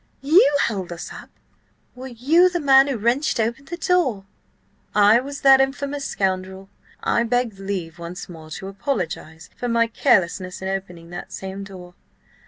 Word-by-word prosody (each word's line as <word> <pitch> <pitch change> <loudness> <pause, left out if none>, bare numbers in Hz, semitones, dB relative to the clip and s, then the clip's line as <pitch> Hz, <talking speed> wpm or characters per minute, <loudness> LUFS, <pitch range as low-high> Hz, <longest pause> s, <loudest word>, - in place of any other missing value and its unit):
You 290 -1 +5
held 190 -6 -3
us 170 - -7
up? - - -11 0.6
Were 255 +1 -9
you 290 +9 +3
the 350 -1 -2
man 270 -2 +6
who 275 -4 -1
wrenched 240 +5 0
open 235 +5 -1
the 345 +5 -6
door?" 290 - +1 0.7
"I 210 +2 +6
was 280 +2 -7
that 270 -1 +7
infamous 280 +1 -2
scoundrel. 190 0 -3 0.3
I - - +2
beg 235 -3 -1
leave 185 -4 -5
once 170 +2 -7
more 160 -3 -11
to 190 +4 -7
apologise 180 - -4
for 245 - -4
my 230 -1 +3
carelessness 190 -6 +1
in 190 - -4
opening 180 -3 -6
that 175 - -8
same 190 +1 -6
door. 185 -3 -11
220 Hz, 160 wpm, -22 LUFS, 190-270 Hz, 0.7 s, that